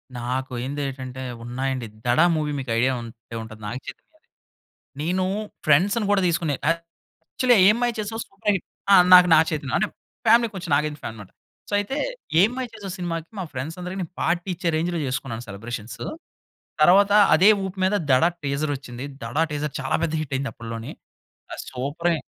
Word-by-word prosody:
నాకు 130 +2 -3
ఏంది 145 +2 -3
ఏటంటే 130 -1 -7 0.2
ఉన్నాయండి, 130 0 -3 0.2
'దడ' 125 +7 +4
మూవీ 150 -1 -1
మీకు 130 -3 -5
ఐడియా 130 +2 +3
ఉంటే 115 0 -11
ఉంటది 110 -1 -11
నాగచైతన్యది. 120 +6 -5 1.1
నేను 180 +4 0 0.4
ఫ్రెండ్స్‌ని 195 +9 +3
కూడా 200 -1 +3
తీసుకునే 165 -4 0 0.2
యాక్చువల్లీ 170 - -1
'ఏం 210 - +6
మాయ 240 0 +2
చేసావే' 225 +2 -3
సూపర్ 195 +1 -1
హిట్. 185 - -4 0.3
ఆ! - - +9 0.2
నాకు 180 0 +9
నాగ 160 - +7
చైతన్య 145 -4 -3
అంటే - - +1 0.4
ఫ్యామిలీ 230 +1 +6
కొంచెం 175 -2 -6
నాగార్జున 150 0 -1
ఫ్యాన్ 110 - -4
అన్నమాట. 105 -3 -12 0.4
సో - - -6
అయితే 235 +8 -3 0.4
'ఏం 210 - +5
మాయ 255 -1 -2
చేసావే' 200 -4 -7
సినిమాకి 165 -2 -4
మా - - -2
ఫ్రెండ్స్ 150 +7 -5
అందరికి 185 +2 -5
నేను 175 0 -6
పార్టీ 175 +2 0
ఇచ్చే 175 -2 -1
రేంజ్‌లో 170 +1 -1
చేసుకున్నాను 125 -2 -4
సెలబ్రేషన్సు. 110 +2 -6 0.8
తరువాత 200 +4 +6 0.2
అదే 190 +6 +6 0.2
ఊపు 190 +1 -6
మీద 200 +2 +2 0.2
'దడ' 145 +7 +5
టీజర్ 145 +1 -1
వచ్చింది. 125 0 -8 0.2
'దడ' 120 +8 -1
టీజర్ 150 0 -3
చాలా 135 - 0
పెద్ద 160 -1 -1
హిట్ 140 -3 -5
అయింది 135 0 -3
అప్పట్లోనే. 115 0 -7 0.6
అది - - -5
సూపరె! 150 +6 -1
155 Hz, 165 wpm, -24 LUFS, 130-180 Hz, 1.1 s, ఆ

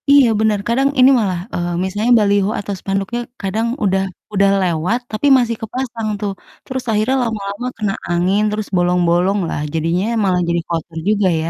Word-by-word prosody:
Iya 280 -3 +7
benar. 215 -1 +2
Kadang 265 +4 +2
ini 255 +1 +8
malah, 190 -5 -1
eee, 175 0 -2
misalnya 205 +5 0
baliho 200 -1 +2
atau 205 0 -4
spanduknya 195 +5 -2 0.2
kadang 215 +4 -1 0.2
udah 190 -1 +2 0.3
udah 200 0 +3
lewat 180 +6 0
tapi 215 +6 0
masih 235 -2 0
kepasang 230 -1 -4
tuh. 205 -1 -1 0.3
Terus 260 -1 -4
akhirnya 215 +5 +1
lama-lama 215 0 -4
kena 210 -3 -1 0.2
angin, 180 +4 +2
terus 210 0 -3
bolong-bolonglah 175 0 +1
jadinya 165 +4 0 0.2
malah 180 -2 +2
jadi 170 0 +1
kotor 165 0 -4
juga 205 -2 +2
ya, 160 - -2
200 Hz, 160 wpm, -18 LUFS, 180-225 Hz, 0.3 s, ini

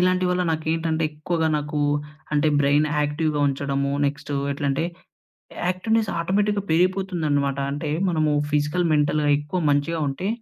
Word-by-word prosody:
ఇలాంటి 185 0 +2
వల్ల 180 0 +1
నాకేంటంటే, 160 0 -1
ఎక్కువగా 160 +2 -1
నాకు 150 0 -3 0.5
అంటే 150 +1 +3
బ్రైన్ 145 +2 +3
యాక్టివ్‌గా 150 0 0
ఉంచడము. 140 0 -1
నెక్స్ట్ 145 +1 -3 0.2
ఎట్లంటే, 140 +2 -1 0.8
యాక్టివ్‌నెస్ 220 +4 0
ఆటోమేటిక్‌గా 200 +3 +1
పెరిగిపోతుందనమాట. 165 -6 +1
అంటే 145 +1 -3 0.2
మనము 155 -3 +1 0.2
ఫిజికల్, 150 +4 +1
మెంటల్‌గా 150 0 +2
ఎక్కువ 150 +5 -3
మంచిగా 145 +3 0
ఉంటే, 180 +9 -3
155 Hz, 120 wpm, -23 LUFS, 145-180 Hz, 0.8 s, అంటే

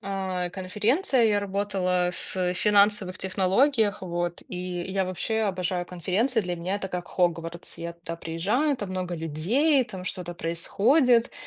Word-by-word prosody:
а, 190 -3 -2
конференция. 225 - +1
И - - +5
я 205 -1 +2
работала 190 -3 0
ф 180 - -7 0.2
финансовых 200 -1 +3
технологиях. 205 +4 +2
Вот, 175 -1 -3
и 180 - -6 0.3
я 190 +1 -1
вообще 185 +5 -2
обожаю 185 -2 -1
конференции. 195 +8 0
Для 180 -3 -3
меня 175 +3 -2
это 200 - -4
как 180 -2 -5
"Хогвартс". 170 -1 -2
Я 170 0 -5
туда 170 0 -7
приезжаю, 200 - 0
там 205 -5 -5
много 180 -2 -3
людей, 205 - +2
там 190 -6 -8
что-то 180 -2 -4
происходит, 230 - +2
190 Hz, 145 wpm, -26 LUFS, 175-210 Hz, 0.3 s, И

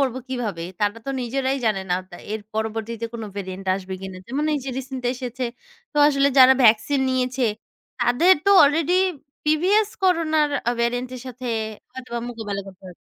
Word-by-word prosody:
করব 265 -3 +1
কিভাবে? 220 -10 -3 0.2
তারা 205 +1 +1
তো - - -1
নিজেরাই 265 +2 -1
জানে 210 -3 +1
না 180 - +4 0.2
তা 175 - -9 0.2
এর 220 - -3
পরবর্তীতে 225 +1 -3
কোন 225 - -5
ভেরিয়েন্ট 190 0 -6
আসবে 190 -1 -6
কিনা? 190 -1 -7
যেমন 275 +5 -2
এই - - 0
যে 270 - -3
রিসেন্ট 265 -1 -6
এসেছে। 250 0 -5 0.5
তো - - -11
আসলে 275 -1 +3
যারা 260 0 +9
ভ্যাকসিন 230 +5 +4
নিয়েছে, 255 0 0 0.6
তাদের 335 +10 +5
তো 400 - +4
অলরেডি 320 +4 +2 0.5
প্রিভিয়াস 370 +8 +3
করোনার 315 -5 +2 0.3
ভেরিয়েন্ট 245 +1 -1
এর 250 - -7
সাথে 250 0 -7 0.5
হয়তোবা 250 -2 -6
মোকাবেলা 215 -4 -4
করতে 190 -1 -13
হবে। 180 - -10
250 Hz, 165 wpm, -23 LUFS, 220-275 Hz, 0.6 s, যারা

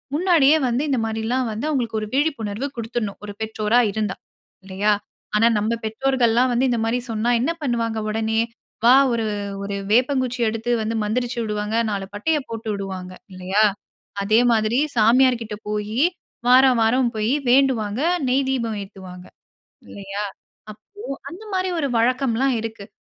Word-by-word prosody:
முன்னாடியே 315 -4 +4
வந்து 245 +4 0
இந்த 265 - +1
மாதிரி 220 0 -3
எல்லாம் 255 +1 0
வந்து 220 +7 -4
அவங்களுக்கு 235 -7 -1
ஒரு 215 - -4
விழிப்புணர்வு 270 -5 -1
கொடுத்துடணும். 225 -3 -4
ஒரு 205 - -6
பெற்றோரா 220 +1 +1
இருந்தா. 210 -2 -2 0.5
இல்லையா. 195 +2 0 0.4
ஆனா 225 +2 +5
நம்ம 220 +3 0
பெற்றோர்கள்லாம் 245 +1 +2
வந்து 255 +2 +2
இந்த 235 - 0
மாதிரி 235 +2 0
சொன்னா 225 +2 0
என்ன 295 +7 +1
பண்ணுவாங்க 230 -4 -1
உடனே? 220 +1 0 0.5
வா 245 - +8 0.2
ஒரு 230 -1 -1 0.4
ஒரு 200 0 -4 0.2
வேப்பங்குச்சி 255 +1 +2
எடுத்து 225 +2 -3
வந்து 225 +1 -2
மந்திரிச்சு 240 +3 -2
விடுவாங்க. 210 0 -2 0.2
4 195 -1 -3
பட்டைய 300 +10 0
போட்டு 225 -1 -6
விடுவாங்க. 190 -2 -5 0.2
இல்லையா? 185 +3 +1 0.6
அதே 215 +3 +3
மாதிரி 220 +1 +2 0.2
சாமியார் 245 +3 +4
கிட்ட 215 -2 -5
போய் 210 +1 -3 0.5
வாரம் 255 0 +6
வாரம் 240 +2 +3
போய் 215 +3 0 0.2
வேண்டுவாங்க. 250 -4 +2 0.3
நெய் 265 +2 +2
தீபம் 230 -5 -1
ஏத்துவாங்க. 185 -2 -11 0.6
இல்லையா? 200 +1 -5 0.5
அப்போ 215 - -23 0.3
அந்த 370 +6 -10
மாதிரி 370 0 0
ஒரு 280 - 0
வழக்கம்லாம் 255 +1 +1
இருக்குது. 220 -2 -7
225 Hz, 145 wpm, -22 LUFS, 215-255 Hz, 0.6 s, வா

